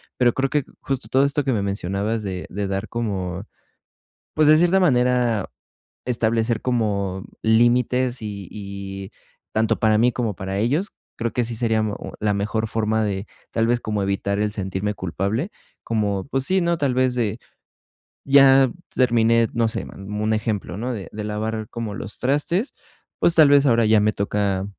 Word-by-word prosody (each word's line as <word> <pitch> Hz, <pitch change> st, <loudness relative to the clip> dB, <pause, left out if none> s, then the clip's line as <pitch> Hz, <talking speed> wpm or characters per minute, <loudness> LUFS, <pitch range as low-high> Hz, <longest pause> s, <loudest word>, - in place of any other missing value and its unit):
Pero 125 Hz, -1 st, +3 dB
creo 135 Hz, 0 st, 0 dB
que, 150 Hz, 0 st, +1 dB, 0.2 s
justo 135 Hz, -1 st, -4 dB
todo 135 Hz, +1 st, +4 dB
esto 145 Hz, +1 st, 0 dB
que 135 Hz, -, 0 dB
me 110 Hz, -5 st, 0 dB
mencionabas 100 Hz, +3 st, -2 dB
de 95 Hz, -2 st, -4 dB
de 100 Hz, +1 st, -3 dB
dar 95 Hz, +2 st, -3 dB
como, 95 Hz, -5 st, -3 dB, 0.9 s
pues, 155 Hz, -1 st, +3 dB
de 155 Hz, +1 st, +7 dB
cierta 175 Hz, +3 st, +4 dB
manera 125 Hz, -, +2 dB, 0.6 s
establecer 115 Hz, -2 st, 0 dB
como 100 Hz, -6 st, -1 dB, 0.2 s
límites 120 Hz, +2 st, +2 dB
y 100 Hz, -3 st, -6 dB
y 100 Hz, -1 st, -7 dB, 0.4 s
tanto 110 Hz, 0 st, +1 dB
para 110 Hz, -1 st, +3 dB
mí 120 Hz, +3 st, +4 dB
como 115 Hz, -4 st, -1 dB
para 95 Hz, +1 st, -4 dB
ellos, 145 Hz, -, 0 dB, 0.2 s
creo 115 Hz, 0 st, -2 dB
que 125 Hz, -, +1 dB
sí 115 Hz, 0 st, -5 dB
sería 110 Hz, -1 st, +1 dB
mo 105 Hz, -1 st, -2 dB, 0.2 s
la 105 Hz, -1 st, +2 dB
mejor 105 Hz, +2 st, -1 dB
forma 110 Hz, 0 st, 0 dB
de, 100 Hz, -1 st, -3 dB, 0.2 s
tal 115 Hz, 0 st, +1 dB
vez, 120 Hz, 0 st, +2 dB
como 105 Hz, -1 st, -2 dB
evitar 100 Hz, +1 st, -1 dB
el 105 Hz, 0 st, 0 dB
sentirme 95 Hz, +1 st, -2 dB
culpable, 100 Hz, -, -2 dB, 0.3 s
como, 105 Hz, -4 st, -1 dB
pues 135 Hz, -1 st, -1 dB
sí, 190 Hz, +3 st, +2 dB
¿no?, 170 Hz, 0 st, +1 dB
tal 140 Hz, -4 st, 0 dB
vez 130 Hz, -1 st, +2 dB
de 115 Hz, -5 st, -1 dB, 0.9 s
Ya 135 Hz, -1 st, +7 dB, 0.3 s
terminé, 115 Hz, -2 st, +3 dB
no 115 Hz, -1 st, +2 dB
sé, -, -, -3 dB
n -, -, -10 dB
un 105 Hz, +2 st, -2 dB
ejemplo, 105 Hz, -4 st, -2 dB
¿no?, 125 Hz, +4 st, -3 dB
de 100 Hz, -4 st, -7 dB
de 105 Hz, -, -6 dB
lavar 110 Hz, +1 st, -3 dB
como 115 Hz, -3 st, -5 dB
los 105 Hz, -1 st, -7 dB
trastes, 150 Hz, -, 0 dB, 0.5 s
pues 170 Hz, -, +3 dB
tal 155 Hz, -3 st, +7 dB
vez 145 Hz, 0 st, +5 dB
ahora 115 Hz, -2 st, +4 dB
ya 110 Hz, 0 st, +5 dB
me 105 Hz, +1 st, +2 dB
toca 100 Hz, -1 st, -1 dB
110 Hz, 175 wpm, -22 LUFS, 100-125 Hz, 0.9 s, de